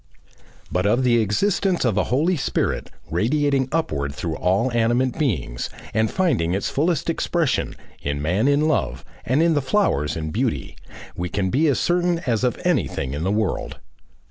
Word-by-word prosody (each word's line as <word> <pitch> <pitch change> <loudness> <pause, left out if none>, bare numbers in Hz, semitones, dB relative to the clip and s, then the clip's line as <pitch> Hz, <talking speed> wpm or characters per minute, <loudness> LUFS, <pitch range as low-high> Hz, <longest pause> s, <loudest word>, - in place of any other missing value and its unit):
But 90 +2 +1
of 120 +5 +2
the 120 -2 +4
existence 185 - +1
of 115 -5 +2
a 105 - +2
Holy 155 +9 +1
Spirit 145 - -1 0.2
radiating 135 - +1
upward 70 - -1
through 80 -3 -3
all 100 +11 +1
animate 120 +4 +1
beings, 70 - -1 0.2
and 110 0 +2
finding 95 - +1
its 100 - -2
fullest 160 +3 0
expression, 165 -2 0 0.3
in 70 0 -2
man 90 - +1
in 145 +2 +3
love, 65 - -1 0.2
and 135 +6 +2
in 170 -1 +3
the 145 - +2
flowers 130 - +1
in 80 -1 -4
beauty, - - -2 0.4
we 90 0 -3
can 95 0 -1
be 155 +5 +3
as 140 - +2
certain 175 0 +1
as 115 -2 0
of 125 -3 0
anything 65 0 0
in 75 - -3
the 90 - 0
world. 105 -1 -1
120 Hz, 170 wpm, -22 LUFS, -, 0.4 s, the